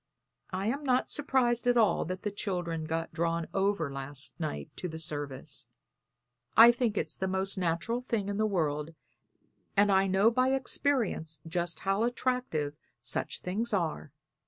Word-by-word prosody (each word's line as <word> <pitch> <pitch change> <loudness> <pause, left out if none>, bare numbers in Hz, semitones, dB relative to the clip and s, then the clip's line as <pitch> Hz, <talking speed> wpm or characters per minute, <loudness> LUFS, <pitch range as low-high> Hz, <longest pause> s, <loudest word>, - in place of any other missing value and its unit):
I 190 +1 -3
am 275 +7 -1
not 255 -2 +2
surprised 250 -4 +1
at 245 0 +4
all 220 -3 +3
that 185 +3 -5
the 210 - -1
children 175 -5 -3
got 165 +1 -3
drawn 165 0 0
over 195 -7 +1
last 135 +1 -3
night 75 - -4
to 180 - -3
the 160 -2 -6
service. 145 -4 -3 0.9
I 230 +2 +11
think 235 -3 0
it's - - -1
the 190 - -2
most 190 +1 0
natural 185 +6 -1
thing 230 -5 -1
in 200 0 -2
the 215 0 +2
world, 155 -4 -1 0.8
and 205 0 +5
I 195 0 +4
know 195 +4 +4
by 255 +2 +2
experience 250 - 0
just 175 -1 -2
how 195 +2 +1
attractive 240 - 0 0.3
such - - -2
things 215 +6 -2
are. 165 - -1
190 Hz, 160 wpm, -30 LUFS, 165-230 Hz, 0.9 s, I